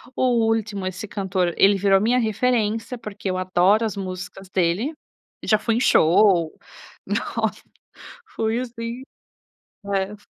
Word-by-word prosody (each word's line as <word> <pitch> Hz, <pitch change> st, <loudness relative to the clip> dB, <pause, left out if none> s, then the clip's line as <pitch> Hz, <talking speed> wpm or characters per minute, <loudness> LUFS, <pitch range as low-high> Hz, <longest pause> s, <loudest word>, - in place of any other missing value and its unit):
O 240 Hz, -3 st, +2 dB
Ultimo, 215 Hz, -4 st, -1 dB
esse 185 Hz, +3 st, -5 dB
cantor, 190 Hz, -4 st, -1 dB
ele 200 Hz, +1 st, +5 dB
virou 195 Hz, 0 st, +3 dB
a 195 Hz, -, 0 dB
minha 245 Hz, +3 st, +2 dB
referência, 225 Hz, 0 st, 0 dB
porque 205 Hz, -3 st, -5 dB
eu 185 Hz, -, -2 dB
adoro 185 Hz, +4 st, +3 dB
as 215 Hz, -3 st, -3 dB
músicas 185 Hz, 0 st, -7 dB
dele, 190 Hz, -, 0 dB, 0.5 s
já 215 Hz, -, +3 dB
fui 225 Hz, +1 st, -1 dB
em -, -, +1 dB
show, 170 Hz, -4 st, +4 dB, 0.5 s
nossa, -, -, -2 dB, 0.7 s
foi 225 Hz, +2 st, 0 dB
assim, 235 Hz, 0 st, -6 dB, 0.9 s
é. 195 Hz, +2 st, -1 dB
205 Hz, 135 wpm, -22 LUFS, 185-230 Hz, 0.9 s, ele